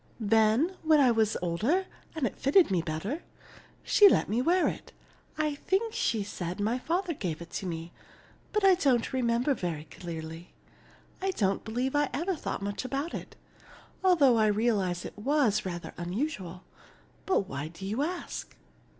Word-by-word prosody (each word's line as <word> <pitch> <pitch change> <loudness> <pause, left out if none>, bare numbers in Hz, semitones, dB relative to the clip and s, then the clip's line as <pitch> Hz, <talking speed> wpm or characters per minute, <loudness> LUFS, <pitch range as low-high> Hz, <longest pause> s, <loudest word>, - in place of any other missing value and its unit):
Then 225 - +3
when 310 -1 +4
I 260 -3 +5
was 220 -2 +2
older 225 - +1 0.3
and 310 -5 0
it 220 - -4
fitted 295 - +4
me 180 -3 +2
better, 170 - -3 0.6
she 410 -1 +7
let - - +2
me 225 +4 0
wear 350 +6 +3
it. - - -5 0.4
I 305 -1 0
think 390 +9 -1
she 220 -3 0
said 180 -3 -5
my 220 +5 0
father 345 +5 -1
gave 175 - -4
it 170 0 -10
to 190 - -4
me. 165 0 -5 0.7
I 385 -1 +7
don't 270 -9 +1
remember 245 +2 +1
very 170 - -3
clearly. 165 0 -8 0.7
I 385 - 0
don't 200 - 0
believe 245 +5 -2
I 290 -1 +2
ever 350 +6 -1
thought 245 - -4
much 205 +3 -3
about 275 +6 -3
it, - - -7 0.7
although 295 -10 +5
I 215 -1 +4
realized 205 -5 +1
it - - -9
was 225 -5 +2
rather 175 -1 -6
unusual. 185 - -4 0.6
But 385 - +3
why 145 -6 -5
do 170 +4 -9
you 215 +7 -1
ask?" 345 +4 -4
230 Hz, 160 wpm, -29 LUFS, 185-300 Hz, 0.7 s, she